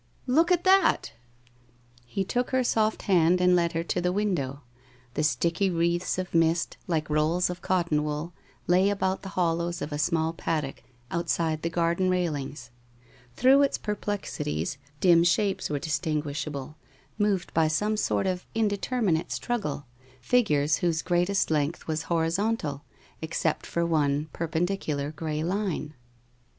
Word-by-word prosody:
1 255 - 0
Look 335 +3 +4
at 350 -1 +3
that! 380 +1 +3 0.5
' 120 0 -33 0.2
He 195 +11 -2
took 245 +6 -1
her 260 -1 +2
soft 220 -2 +1
hand 180 -2 +4
and 180 0 +4
led 170 -1 +1
her 165 0 -1
to 175 +1 -1
the 180 0 +1
window. 175 -9 -1 0.5
The - - -1
sticky 165 +7 +1
wreaths 170 +1 0
of 185 -1 -4
mist, 165 0 +2
like 160 -4 0
rolls 155 +4 +1
of 180 - -8
cotton 170 -5 +1
wool, 150 +3 -4 0.3
lay 185 +3 +4
about 190 -1 -1
the 195 - -7
hollows 170 0 0
of 150 - -5
a 145 - -3
small 160 0 +1
paddock, 155 -4 -3 0.3
outside 165 -2 0
the 165 - -1
garden 170 +2 +1
rail 180 -3 +1
ings. 135 -3 -7 0.6
Through 265 +3 +5
its 280 - +2
perplexities 165 - -3 0.2
dim 170 -2 +5
shapes 195 +3 +1
were 150 - -1
dis 150 +2 -1
tinguishable, 150 -3 -3 0.5
moved 200 -3 0
by 160 -1 +3
some 210 +8 0
sort 210 - 0
of 185 -1 -2
indeterminate 210 -4 0
struggle, 200 - -3 0.3
figures 150 - +2
whose 165 -2 0
greatest 180 +1 +1
length 150 +2 0
was 155 -1 -2
horizontal, 165 -2 0 0.4
except 160 0 -1
for 170 0 0
one 150 -2 +1
perpendicular 160 -3 -2
gray 155 0 -3
line. 180 -4 -2
170 Hz, 150 wpm, -27 LUFS, 155-190 Hz, 0.6 s, Through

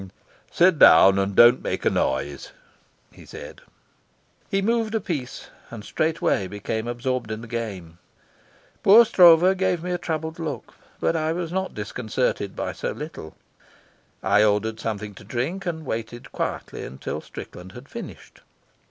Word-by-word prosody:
"Sit 175 -3 +3
down, 95 0 +7
and 95 0 -1
don't 120 +2 +7
make - - -3
a - - +5
noise," 65 +1 -2 0.6
he - - -16
said. - - -11 0.9
He 195 - +1
moved 225 +2 0
a - - +2
piece 145 - -5 0.2
and 115 -3 -9
straightway 155 - 0
became 105 +3 -4
absorbed 120 0 -3
in 110 0 -5
the 120 - -9
game. 100 -8 -6 0.8
Poor 225 +4 +8
Stroeve 180 -1 +6
gave 185 -3 0
me 180 - -3
a 175 - -1
troubled 160 0 -4
look, 150 -8 -5 0.3
but - - 0
I 160 0 0
was 170 -1 -4
not 190 +1 -3
disconcerted 105 -1 -2
by - - -3
so - - -4
little. 150 - -9 0.9
I 105 - +4
ordered 110 +1 +1
something 105 -2 -4
to 100 - -14
drink, 130 - -3
and 160 -2 -4
waited 115 0 -6
quietly - - -4
till - - -4
Strickland 90 +2 -10
had 125 +4 -12
finished. - - -10
125 Hz, 150 wpm, -24 LUFS, 105-170 Hz, 0.9 s, Poor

